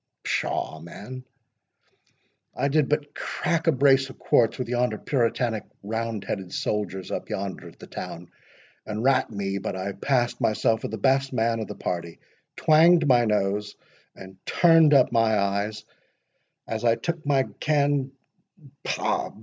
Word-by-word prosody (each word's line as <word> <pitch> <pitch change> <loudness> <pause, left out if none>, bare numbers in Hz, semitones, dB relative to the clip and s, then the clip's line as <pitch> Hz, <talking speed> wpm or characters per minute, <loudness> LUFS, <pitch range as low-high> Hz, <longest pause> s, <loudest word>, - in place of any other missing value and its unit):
"Pshaw! 80 - -2
man, 105 +10 -9 1.3
I 140 +3 0
did 150 -1 +2
but 145 -1 -1
crack 170 -2 -2
a - - +7
brace 135 -1 +3
of 130 - -12
quarts 115 -2 +2
with 125 - -3
yonder 120 -2 0
puritanic, 115 -4 0 0.2
roundheaded 105 -4 -4
soldiers, 100 -3 -3
up - - -4
yonder 95 -1 -4
at - - -14
the - - -11
town; 85 +1 -8 0.6
and 110 +1 -3
rat 130 0 +3
me 100 -2 -3
but 95 - -4
I 95 +2 -3
passed 120 +4 0
myself 110 +1 +1
for - - -3
the 110 - -5
best 135 +4 +1
man 115 -1 +1
of 110 - -4
the - - -7
party; 85 -2 -4 0.4
twanged 160 +1 +5
my 120 -3 +5
nose, 105 -1 0 0.4
and 95 0 -13
turned 165 -3 +5
up 130 -2 +5
my 115 -2 +3
eyes, 100 +2 -1 0.8
as 110 0 -4
I 115 -1 +4
took 165 +7 -4
my 140 -2 +2 0.2
can—Pah! 140 0 -2
115 Hz, 145 wpm, -25 LUFS, 105-135 Hz, 1.3 s, a